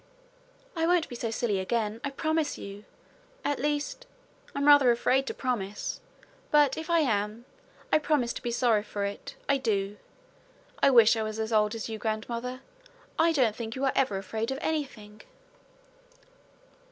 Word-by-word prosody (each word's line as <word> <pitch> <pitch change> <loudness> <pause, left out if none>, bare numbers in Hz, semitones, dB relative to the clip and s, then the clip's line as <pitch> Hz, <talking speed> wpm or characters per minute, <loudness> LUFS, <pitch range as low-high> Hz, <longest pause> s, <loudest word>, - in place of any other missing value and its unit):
'I 325 0 +1
won't 350 -2 +2
be 245 - -7
so 235 -1 -3
silly 220 -3 0
again, 220 +2 -1
I 280 - -1
promise 315 +2 -1
you. 200 +1 -9 0.6
At 290 - 0
least 295 - -2 0.5
I'm 280 0 0
rather 290 -3 +7
afraid 255 +3 +2
to - - -2
promise 210 -6 -3 0.5
but 295 -3 +4
if 320 +1 -6
I 335 -1 +4
am, 215 -3 -1 0.5
I - - +6
promise 290 -6 +1
to - - -7
be 240 - -3
sorry 235 -3 +2
for 205 -1 -4
it 200 0 -6
I 280 -1 +2
do. 205 -4 -1 0.8
I - - +6
wish 235 -4 +7
I 225 - -1
were 215 - -2
as 220 +1 -3
old 210 0 +3
as 225 - -4
you, 220 -1 -5
grandmother. 235 +4 -3 0.6
I 330 +1 +5
don't 250 -9 +2
think 225 -1 -5
you 265 +1 -1
are 270 - +2
ever 255 -8 +1
afraid 220 +4 -3
of 265 - -2
anything.' 215 -9 -4
235 Hz, 165 wpm, -28 LUFS, 215-280 Hz, 0.8 s, rather